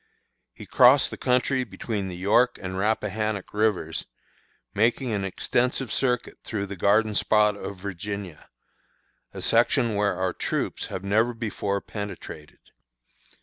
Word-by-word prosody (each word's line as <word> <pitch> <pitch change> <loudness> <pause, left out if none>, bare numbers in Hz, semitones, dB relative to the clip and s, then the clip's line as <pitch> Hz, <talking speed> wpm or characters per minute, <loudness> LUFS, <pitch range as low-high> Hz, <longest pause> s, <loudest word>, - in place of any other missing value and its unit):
He - - -10
crossed 130 +2 +5
the - - -5
country 130 +1 +1
between 100 -1 -4
the 90 - -6
York 105 +7 +3
and 95 -1 -5
Rappahannock 105 0 -1
Rivers, 105 -7 0 0.7
making 115 +4 +1
an 100 -2 -1
extensive 120 +6 -1
circuit 125 -3 -1
through 100 -3 -3
the 100 0 -7
garden 105 +4 +3
spot 105 0 +3
of 100 -1 -7
Virginia 100 -2 -6 0.8
a - - -8
section 115 -2 +3
where 100 -2 +1
our 95 0 -1
troops - - -2
have 95 - -6
never 110 +5 +2
before 100 -3 -2
penetrated. 100 -7 -8
105 Hz, 130 wpm, -25 LUFS, 95-115 Hz, 0.8 s, crossed